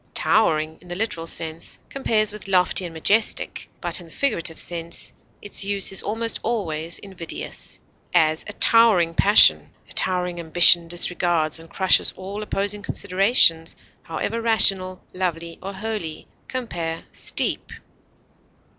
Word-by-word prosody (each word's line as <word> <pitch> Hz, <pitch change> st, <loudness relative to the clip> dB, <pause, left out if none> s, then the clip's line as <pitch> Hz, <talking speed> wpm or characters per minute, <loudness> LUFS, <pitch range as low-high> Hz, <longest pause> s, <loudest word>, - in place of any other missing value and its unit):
Towering, 160 Hz, -6 st, 0 dB
in 180 Hz, -, -18 dB
the 175 Hz, -, -6 dB
literal 175 Hz, -5 st, -4 dB
sense 160 Hz, 0 st, -1 dB
compares 220 Hz, -6 st, 0 dB
with 210 Hz, -1 st, -9 dB
lofty 185 Hz, -1 st, +1 dB
and 170 Hz, -, -8 dB
majestic; 210 Hz, +7 st, -1 dB
but 175 Hz, -1 st, +2 dB
in 175 Hz, -, -13 dB
the -, -, -17 dB
figurative 175 Hz, -, -2 dB
sense, 170 Hz, -1 st, -2 dB, 0.3 s
its 205 Hz, -, -1 dB
use 200 Hz, -1 st, 0 dB
is 195 Hz, -, +1 dB
almost 225 Hz, +2 st, -2 dB
always 165 Hz, -8 st, -3 dB
invidious; 185 Hz, -5 st, -6 dB, 0.3 s
as, 160 Hz, -2 st, +2 dB
a 205 Hz, -, -5 dB
towering 210 Hz, -9 st, +3 dB
passion; 205 Hz, +5 st, +5 dB, 0.2 s
a -, -, -7 dB
towering 180 Hz, -1 st, 0 dB
ambition 170 Hz, +1 st, +6 dB
disregards 175 Hz, -2 st, 0 dB
and 165 Hz, 0 st, -15 dB
crushes 190 Hz, +1 st, +2 dB
all 195 Hz, +3 st, -7 dB
opposing 205 Hz, 0 st, -3 dB
considerations, 185 Hz, -5 st, +2 dB, 0.3 s
however 215 Hz, +7 st, -5 dB
rational, 190 Hz, -5 st, +4 dB
lovely, 170 Hz, -2 st, -5 dB
or 195 Hz, -, -7 dB
holy. 200 Hz, -6 st, -6 dB, 0.2 s
Compare 175 Hz, -10 st, -5 dB
STEEP. -, -, -2 dB
180 Hz, 130 wpm, -21 LUFS, 165-205 Hz, 0.3 s, ambition